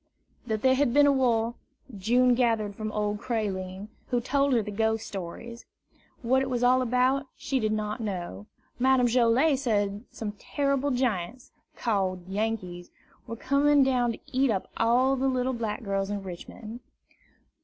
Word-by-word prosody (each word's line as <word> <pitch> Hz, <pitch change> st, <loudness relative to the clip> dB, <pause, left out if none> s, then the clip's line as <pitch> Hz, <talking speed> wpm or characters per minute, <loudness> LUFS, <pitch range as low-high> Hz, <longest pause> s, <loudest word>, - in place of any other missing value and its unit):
That 220 Hz, -2 st, -2 dB
there 260 Hz, 0 st, +5 dB
had 260 Hz, -2 st, +1 dB
been 290 Hz, 0 st, +7 dB
a 285 Hz, -, +5 dB
war, 240 Hz, -4 st, +1 dB, 0.4 s
June 245 Hz, +6 st, +3 dB
gathered 225 Hz, -4 st, +1 dB
from 215 Hz, 0 st, -4 dB
old 210 Hz, 0 st, -1 dB
Creline, 200 Hz, -4 st, -3 dB, 0.2 s
who 245 Hz, -, +1 dB
told 275 Hz, +3 st, +1 dB
her 230 Hz, -3 st, +2 dB
the 210 Hz, -, -6 dB
ghost 220 Hz, +1 st, 0 dB
stories. 205 Hz, +6 st, -7 dB, 0.6 s
What 260 Hz, +3 st, +3 dB
it 265 Hz, -, -2 dB
was 245 Hz, -1 st, -1 dB
all 255 Hz, +1 st, +4 dB
about, 255 Hz, +3 st, +1 dB
she 270 Hz, -, -1 dB
did 215 Hz, -2 st, 0 dB
not 215 Hz, +1 st, -2 dB
know. 175 Hz, -, -5 dB, 0.3 s
Madame 260 Hz, 0 st, +4 dB
Joilet 250 Hz, +4 st, +3 dB
said 205 Hz, -5 st, -1 dB
some 215 Hz, -2 st, -5 dB
terrible 280 Hz, -1 st, 0 dB
giants, 245 Hz, -3 st, -2 dB, 0.2 s
called 190 Hz, -5 st, -1 dB
Yankees, 190 Hz, -4 st, -3 dB, 0.4 s
were 230 Hz, -, -5 dB
coming 280 Hz, +3 st, +3 dB
down 250 Hz, -3 st, +1 dB
to -, -, -10 dB
eat 265 Hz, +1 st, +2 dB
up 195 Hz, -4 st, -2 dB
all 250 Hz, +4 st, +3 dB
the 270 Hz, +1 st, 0 dB
little 255 Hz, 0 st, 0 dB
black 230 Hz, -1 st, -3 dB
girls 195 Hz, -1 st, -1 dB
in 205 Hz, -1 st, -3 dB
Richmond. 215 Hz, +5 st, -9 dB
230 Hz, 160 wpm, -27 LUFS, 210-255 Hz, 0.6 s, been